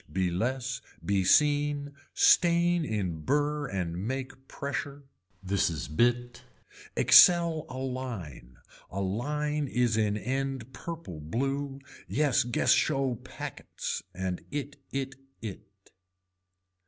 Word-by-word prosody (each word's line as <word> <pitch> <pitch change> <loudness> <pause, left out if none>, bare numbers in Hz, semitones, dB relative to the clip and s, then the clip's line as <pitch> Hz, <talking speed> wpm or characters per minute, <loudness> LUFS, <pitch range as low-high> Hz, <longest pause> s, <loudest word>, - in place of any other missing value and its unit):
Be 90 +1 0
less 125 +6 -2 0.2
be 100 -1 +2
seen, 145 +5 +3 0.2
stain 175 0 +4
in 95 - -2
burr 145 - 0
and 90 -6 -3
make 130 0 -5
pressure. 140 0 -4 0.4
This 95 0 +1
is 80 -3 -4
bit. 120 +8 +1 0.5
Excel 170 -3 +6
a 130 - -7
line, 115 - -5 0.3
a 100 - -5
line 150 +9 -1
is 120 -3 +1
in 105 -1 +1
end 130 +1 -3
purple 160 - -7
blue, 135 - -2 0.3
yes 145 -5 +2
guess 120 0 +1
show 135 -4 +2
packets 120 - -6
and 95 0 -3
it 145 -1 -4
it 135 -1 -3 0.2
it. 105 -1 -7
130 Hz, 110 wpm, -29 LUFS, 100-145 Hz, 0.5 s, Excel